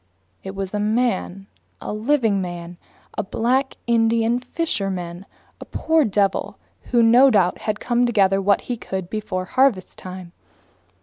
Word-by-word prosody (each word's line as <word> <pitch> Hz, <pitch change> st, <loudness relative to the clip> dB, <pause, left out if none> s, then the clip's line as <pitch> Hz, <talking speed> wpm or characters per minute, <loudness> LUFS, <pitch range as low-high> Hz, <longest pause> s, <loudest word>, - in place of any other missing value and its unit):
It 190 Hz, 0 st, -7 dB
was 195 Hz, 0 st, -4 dB
a 210 Hz, -, -1 dB
man, 210 Hz, -3 st, -1 dB, 0.3 s
a -, -, -5 dB
living 225 Hz, -3 st, +1 dB
man, 175 Hz, -1 st, -6 dB, 0.4 s
a -, -, 0 dB
black 250 Hz, +6 st, 0 dB
Indian 230 Hz, 0 st, +2 dB
fisherman, 195 Hz, -, -3 dB, 0.3 s
a -, -, -9 dB
poor 320 Hz, -2 st, +1 dB
devil 200 Hz, -2 st, 0 dB, 0.3 s
who 240 Hz, -2 st, +3 dB
no 245 Hz, +4 st, +7 dB
doubt 190 Hz, -7 st, +2 dB
had 215 Hz, -1 st, -3 dB
come 245 Hz, 0 st, +1 dB
to -, -, -1 dB
gather 195 Hz, -3 st, +3 dB
what 200 Hz, +1 st, +2 dB
he 245 Hz, -, -4 dB
could 190 Hz, -4 st, -5 dB
before 205 Hz, -4 st, -3 dB
harvest 250 Hz, -6 st, +1 dB
time. 185 Hz, -1 st, -9 dB
210 Hz, 145 wpm, -22 LUFS, 190-240 Hz, 0.4 s, no